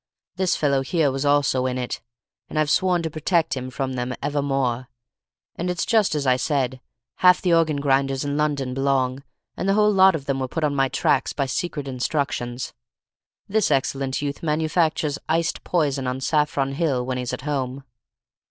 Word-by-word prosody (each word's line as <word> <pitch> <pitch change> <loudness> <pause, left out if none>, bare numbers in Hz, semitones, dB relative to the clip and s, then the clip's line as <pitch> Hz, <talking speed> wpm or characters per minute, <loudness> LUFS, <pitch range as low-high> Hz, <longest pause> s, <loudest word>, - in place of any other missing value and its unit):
This 185 0 +1
fellow 140 -3 +1
here 150 0 +1
was 135 +2 -2
also 140 -3 +2
in 130 0 -2
it, 125 -1 -4 0.5
and - - -5
I've 155 -1 +2
sworn 180 -1 +2
to 160 - -1
protect 160 +1 +1
him 130 -1 -5
from 130 0 -3
them 125 0 -3
evermore; 135 -3 -1 0.7
and 175 +2 -3
it's 180 -1 -1
just 215 -8 +2
as 145 -2 -1
I 130 -1 +4
said, 130 -1 -1 0.4
half 180 -1 +6
the 180 -2 +1
organ 165 -2 +3
grinders 135 0 +1
in 145 0 -2
London 145 -4 0
belong, 135 -1 0 0.3
and 190 - -2
the 195 - +3
whole 210 0 +4
lot 190 -2 +6
of 140 -4 -5
them 140 -2 -1
were 130 - -1
put 160 +5 -3
on 150 -1 +1
my 135 -1 +2
tracks 135 - +1
by 140 - 0
secret 145 +2 -3
instructions. 130 -1 -2 0.7
This 215 0 +1
excellent 135 -1 0
youth 140 -1 -3
manufactures 155 -1 0
iced 165 +1 0
poison 140 -6 0
on 125 +1 -2
Saffron 145 -1 +1
Hill 140 -5 0
when 130 0 -2
he's 125 -1 -3
at - - -5
home." 135 -2 -3
140 Hz, 180 wpm, -23 LUFS, 130-160 Hz, 0.7 s, half